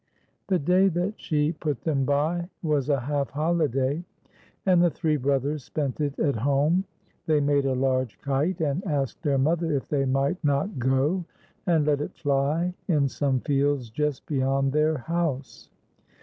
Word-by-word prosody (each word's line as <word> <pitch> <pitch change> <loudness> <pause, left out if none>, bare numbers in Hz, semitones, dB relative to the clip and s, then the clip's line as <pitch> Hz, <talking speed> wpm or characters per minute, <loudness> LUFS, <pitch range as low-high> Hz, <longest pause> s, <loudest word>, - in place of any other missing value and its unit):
The 190 - +2
day 180 +5 +3
that 180 +3 0
she 150 -1 0
put 150 -4 -4
them 140 -5 +1
by 160 +6 0
was 150 -3 0
a 140 -3 +2
half 140 +1 -1
holiday, 150 -1 0 0.6
and 180 -3 +5
the 175 - +5
three 160 -1 0
brothers 140 +1 0
spent 145 0 -3
it 145 -1 -1
at 140 -6 +1
home. 145 - +2 0.4
They 155 -2 +3
made 140 -1 +2
a 130 - +1
large 130 -5 0
kite, 145 - -1
and 155 +4 0
asked 140 -5 -2
their 145 -4 +1
mother 160 +4 +1
if 135 - -3
they 140 -2 0
might 135 +6 0
not 145 +4 0
go 135 +8 +1 0.4
and 160 -4 +3
let 145 -1 +2
it - - -5
fly 145 +5 0
in 150 -6 +2
some 135 -2 0
fields 140 -4 0
just 150 +3 -2
beyond 135 -1 +1
their 155 +1 +2
house. 150 -2 -3
145 Hz, 165 wpm, -26 LUFS, 135-160 Hz, 0.6 s, and